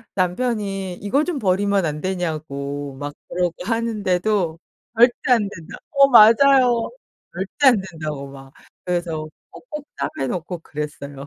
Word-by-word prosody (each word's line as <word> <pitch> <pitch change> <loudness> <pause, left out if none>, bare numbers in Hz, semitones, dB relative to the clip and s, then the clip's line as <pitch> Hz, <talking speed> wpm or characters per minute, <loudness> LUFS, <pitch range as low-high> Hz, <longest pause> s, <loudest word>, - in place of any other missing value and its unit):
남편이 195 -1 -1
이거 245 +11 0
좀 330 -5 -3
버리면 195 -1 +1
안 150 0 -3
되냐고 145 -6 -4
막 145 0 -5 0.2
그러고 175 -1 0
하는데도 205 -6 0 0.4
"절대 245 +2 +4
안 215 -5 +3
된다." 165 -5 -10
어. 275 -1 +6
맞아요. 245 +1 +6 0.4
절대 190 +10 0
안 230 -7 +5
된다고 150 -4 -6
막 135 0 -13 0.3
그래서 170 -3 -2 0.2
꼭꼭 300 -11 -9
싸매 135 - -3
놓고 175 +3 -4
그랬어요. 145 -2 -7
185 Hz, 265 characters per minute, -21 LUFS, 155-230 Hz, 0.4 s, 어